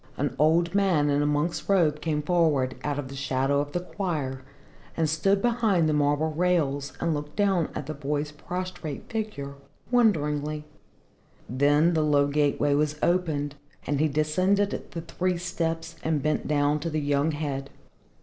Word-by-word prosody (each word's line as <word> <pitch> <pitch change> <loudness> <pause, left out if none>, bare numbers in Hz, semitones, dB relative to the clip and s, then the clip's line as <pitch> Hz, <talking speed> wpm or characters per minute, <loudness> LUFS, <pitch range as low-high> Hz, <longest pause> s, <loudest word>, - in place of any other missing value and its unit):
An 140 -2 -1
old 165 +3 +3
man 180 -8 +3
in 145 +1 +2
a 145 - +1
monk's 150 +6 -1
robe 160 -6 +3
came 150 -2 -1
forward 150 -7 +2
out 145 -1 -1
of 145 -2 -4
the 135 - -9
shadow 135 +1 0
of 145 0 -5
the 175 - -1
choir 155 -9 -3 0.6
and 165 -1 +2
stood 195 +6 +1
behind 225 -8 +2
the 155 - +1
marble 145 +1 +1
rails 150 -5 0
and 170 -1 0
looked 150 0 -5
down 195 -5 +2
at - - -4
the 155 - -4
boy's 145 +1 -2
prostrate 175 -1 -6
figure, 210 -11 -4 0.4
wonderingly. 150 - +1 0.8
Then 145 +6 +3
the 160 - +2
low 145 -2 +3
gateway 145 0 +1
was 150 +1 +1
opened 155 -5 +1 0.3
and 145 -1 -1
he 155 - +3
descended 185 +7 +1
the 165 - -6
three 180 +2 -1
steps 165 -1 -3
and 155 -3 0
bent 155 0 0
down 145 0 +2
to 165 - -3
the 155 -1 -1
young 145 +1 +1
head. 140 -2 -3
150 Hz, 165 wpm, -26 LUFS, 145-170 Hz, 0.8 s, old